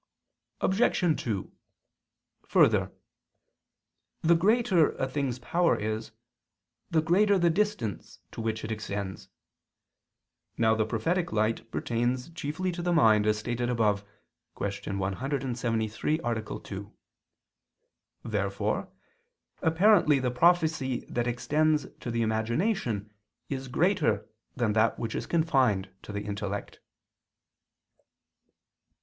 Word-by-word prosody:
Obj. 190 -5 +2
2: 105 -5 -3 1.0
Further, - - +4 1.3
the 165 +1 +5
greater 195 -2 +3
a 135 - -2
thing's 130 -2 -2
power 170 +7 +2
is, 110 +1 -3 0.8
the 160 -2 +2
greater 200 +5 +4
the 170 -2 +3
distance 160 - -2
to - - -6
which 110 -1 -2
it 110 - -4
extends. 100 -2 -5 1.3
Now 110 -1 +4
the 110 -1 0
prophetic 170 +11 0
light 110 +1 0
pertains 120 +6 -1
chiefly 165 +3 -3
to 175 0 -5
the 175 0 0
mind, 110 -10 +5
as 105 0 +3
stated 120 +2 -2
above 105 -4 +1 0.5
(Q. 100 0 -3
173, 120 +4 -1
A. 115 -2 -1 0.2
2). 100 +1 -8 1.3
Therefore 100 -3 -1 0.7
apparently 165 -2 +4
the 130 -2 0
prophecy 155 -2 +2
that 120 0 -1
extends 150 +4 +1
to - - -6
the 115 0 0
imagination 110 - -1 0.4
is 135 -1 -4
greater 155 - +1 0.3
than 115 -5 +1
that 110 +1 +2
which 115 -2 -3
is - - -4
confined 130 - +2
to - - -9
the 100 0 -3
intellect. 100 -1 -5
120 Hz, 110 wpm, -28 LUFS, 110-160 Hz, 1.3 s, the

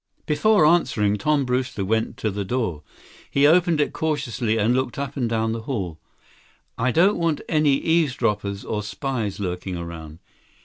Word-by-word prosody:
Before 205 +4 +3
answering, 120 -11 +2
Tom 145 +4 +1
Brewster 125 -5 -1
went 110 +3 -1
to 110 - -1
the 100 +1 -3
door. 95 -8 -2 0.5
He 140 +1 +3
opened 165 +1 +4
it 145 - +1
cautiously 125 -8 -1
and 110 +3 +2
looked 130 -1 -1
up 140 0 -4
and 125 -5 -1
down 110 -1 0
the 115 0 -3
hall. 90 - -3 0.8
"I 130 +2 0
don't 185 - +4
want 165 -3 0
any 150 -3 +3
eavesdroppers 115 -12 0
or 105 - -2
spies 105 0 -3
lurking 90 -1 -4
around." 80 -2 -8
120 Hz, 160 wpm, -23 LUFS, 105-150 Hz, 0.8 s, opened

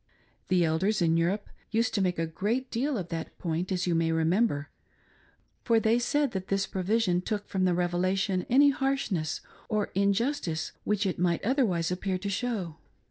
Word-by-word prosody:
The 180 -2 +3
Elders 185 +7 +1
in 165 -2 +3
Europe 180 +5 0 0.2
used 225 +1 +1
to 200 - +1
make 180 -2 +1
a 165 - 0
great 220 +11 -2
deal 260 +3 0
of 180 -4 -5
that 165 -1 -5
point, 170 +2 -2
as 180 -1 0
you 175 - +1
may 165 0 +2
remem 165 +8 +3
ber, 145 -4 -5 0.9
for 230 -2 +4
they 225 +2 +3
said 285 +2 +1
that 190 -2 -4
this 195 0 +1
provision 190 -1 +1
took 205 +2 -3
from 190 -1 0
the 180 -1 +2
Revelation 185 +2 0
any 280 +3 +6
harshness 260 - -1 0.3
or 210 -1 0
injustice 200 - 0
which 210 -1 +1
it 185 - -1
might 175 0 +1
otherwise 210 - +1
appear 185 +1 -1
to 200 +2 -4
show. 195 -7 -2
190 Hz, 180 wpm, -28 LUFS, 175-225 Hz, 0.9 s, any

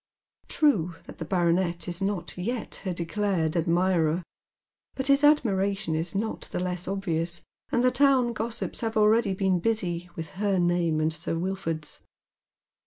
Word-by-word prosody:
True 185 - +2
that - - -12
the - - -4
baronet 170 -2 +1
is 175 +2 -1
not 190 -5 -2
yet 225 +7 -3
her 185 - 0
declared 175 -1 -1
admirer, 170 0 +2 0.7
but 265 - -3
his 275 +1 +4
admiration 200 - +2
is 165 +4 -2
not 220 +3 -3
the - - -2
less 180 -1 -3
obvious, 175 -3 -2 0.3
and 245 - +2
the 255 - +4
town 265 -4 +3
gossips 225 +1 -4
have 225 -1 -1
already 215 -1 +4
been 190 -2 +1
busy 180 -4 -1
with 160 -1 -6
her 200 -2 +2
name 175 -3 +2
and 155 +1 +1
Sir 165 +1 -3
Wilford's. 165 -4 -3
185 Hz, 150 wpm, -27 LUFS, 170-215 Hz, 0.7 s, his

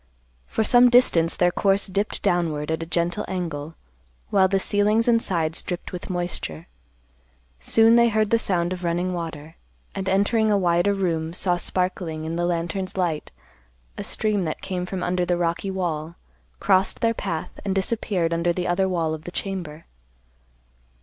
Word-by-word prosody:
For 220 - 0
some 245 +2 +6
distance 180 -10 +4
their 175 0 +3
course 195 +2 +2
dipped 200 +2 -2
downward 165 -5 0
at 160 - -2
a 165 - -5
gentle 175 +4 -1
angle, 165 -4 -4 0.6
while 190 -1 +5
the 195 +1 +1
ceilings 210 +4 +1
and 230 -1 +4
sides 165 -5 -1
dripped 180 -1 -5
with 180 - -7
moisture. 175 - -3 0.9
Soon 225 +1 +5
they 235 0 +5
heard 215 -1 +1
the 230 - +4
sound 180 -4 0
of 180 0 -7
running 175 +2 -1
water, 160 -2 -6 0.4
and 190 -1 -3
entering 215 +3 +2
a 205 - +3
wider 175 +2 +2
room 165 -4 -1
saw 180 0 +1
sparkling 175 -3 -2
in 165 +1 -3
the 175 0 0
lantern's 175 +3 -3
light 170 -5 -1 0.7
a - - -5
stream 210 -3 -1
that 155 - -4
came 180 -2 -3
from 185 -1 -4
under 180 0 0
the 175 0 0
rocky 170 +3 -1
wall, 170 -4 -3 0.4
crossed 190 +1 +2
their 230 0 +2
path, 160 -7 -5
and 195 -1 -1
disappeared 190 -4 0
under 170 +1 +1
the 180 +1 -2
other 190 +2 +1
wall 165 -3 0
of 155 0 -7
the 175 - -6
chamber. 175 -5 -5
180 Hz, 170 wpm, -24 LUFS, 170-195 Hz, 0.9 s, some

